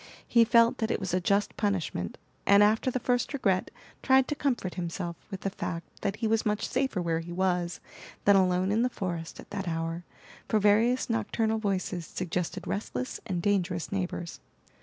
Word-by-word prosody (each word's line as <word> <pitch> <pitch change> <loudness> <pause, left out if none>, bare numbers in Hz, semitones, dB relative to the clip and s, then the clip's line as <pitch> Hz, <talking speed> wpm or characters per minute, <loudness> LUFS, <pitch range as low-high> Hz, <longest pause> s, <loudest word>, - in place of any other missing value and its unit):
He 235 -1 +5
felt 230 0 +4
that 220 - 0
it - - 0
was 190 -3 -3
a 185 - +2
just 200 +2 +1
punishment, 185 - -1 0.3
and 200 +1 +7
after 220 +4 +3
the 255 - -1
first 245 +3 0
regret 195 -9 +1 0.3
tried 265 0 +4
to 295 - 0
comfort 250 -11 -1
himself 170 0 -4
with 195 -2 -6
the 195 - -2
fact 170 -4 -6
that 200 0 -1
he 225 +1 -1
was 220 0 +2
much 210 -1 0
safer 260 -6 0
where 165 -2 0
he 165 +1 -7
was 180 -1 0 0.5
than 200 - +7
alone 185 0 +3
in 220 +2 +2
the 250 - +2
forest 170 -7 -5
at - - -12
that 195 -2 -4
hour, 165 +1 -2 0.4
for 220 - +2
various 220 +5 +3
nocturnal 220 0 0
voices 185 -5 -2
suggested 180 -1 -3
restless 225 +5 -3
and 175 -4 -2
dangerous 185 -4 0
neighbors. 180 -3 -3
200 Hz, 180 wpm, -29 LUFS, 175-225 Hz, 0.5 s, and